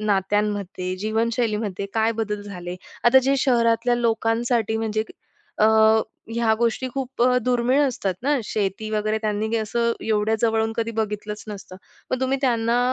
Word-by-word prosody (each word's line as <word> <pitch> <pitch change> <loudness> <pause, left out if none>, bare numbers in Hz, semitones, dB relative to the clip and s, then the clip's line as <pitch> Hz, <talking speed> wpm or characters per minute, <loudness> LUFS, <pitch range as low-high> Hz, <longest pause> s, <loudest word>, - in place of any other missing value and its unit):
नात्यांमध्ये, 200 -2 -1
जीवनशैलीमध्ये 215 -2 -1
काय 225 +1 +2
बदल 210 -1 -3
झाले 180 -3 -7 0.3
आता 250 +2 +7
जे 275 +1 +2
शहरातल्या 240 -2 +2
लोकांसाठी 225 -1 +1
म्हणजे 220 -1 -1 0.5
अ, 215 - +4 0.7
ह्या 230 -1 +2
गोष्टी 235 +2 0
खूप 265 -2 -2
अ, 250 0 +4
दुर्मिळ 250 +2 +2
असतात 200 -7 -2
ना, 285 +1 +2
शेती 215 +1 -2
वगैरे 215 0 0
त्यांनी 215 +1 -1
असं 235 +2 0
एवढ्या 215 0 +1
जवळून 225 -1 +2
कधी 230 0 -1
बघितलंच 210 0 -4
नसतं, 195 -3 -8 0.3
मग 255 - -1
तुम्ही 265 +1 +1
त्यांना 235 -1 +2
220 Hz, 140 wpm, -23 LUFS, 210-235 Hz, 0.7 s, आता